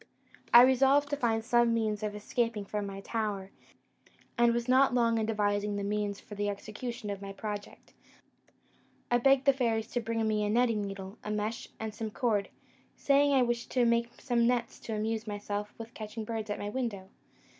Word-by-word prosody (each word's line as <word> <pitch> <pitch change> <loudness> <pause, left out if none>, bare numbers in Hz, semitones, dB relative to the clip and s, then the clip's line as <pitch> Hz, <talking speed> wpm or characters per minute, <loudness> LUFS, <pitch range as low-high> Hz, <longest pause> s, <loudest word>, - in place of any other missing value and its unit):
"I 240 +1 +10
resolved 270 +3 +4
to - - +2
find 225 -5 0
some 240 -1 +3
means 215 -2 -1
of 210 -1 -3
escaping 220 0 -1
from 205 0 -3
my 195 0 -7
tower, 205 -3 -3 0.8
and 235 -1 +4
was 235 +1 -1
not 260 0 +4
long 230 -2 +3
in 220 - -1
devising 205 -1 0
the 200 - -2
means 205 0 -2
for - - -12
the 205 0 -1
execution 215 +2 -5
of 200 -1 -6
my 200 0 -6
project: 205 +1 -7 1.2
I 240 - +4
begged 270 +2 +4
the 275 - +6
fairies 230 -4 0
to 245 - -1
bring 225 0 -1
me 215 -1 +1
a 205 - 0
netting 230 -1 +2
needle, 195 0 -6
a - - -5
mesh, 210 +2 -3
and 220 -1 -4
some 220 +1 -4
cord, 210 -3 0 0.5
saying 285 0 +3
I 260 - +5
wished 240 -1 -2
to 250 -2 +3
make 235 0 0
some 235 -2 +1
nets 240 -1 -1
to 220 - -5
amuse 220 +1 -2
myself 205 0 -4
with 230 0 -9
catching 215 +1 -6
birds 220 -1 -4
at 205 - -2
my 205 - -4
window. 210 -5 -3
225 Hz, 190 wpm, -30 LUFS, 210-240 Hz, 1.2 s, I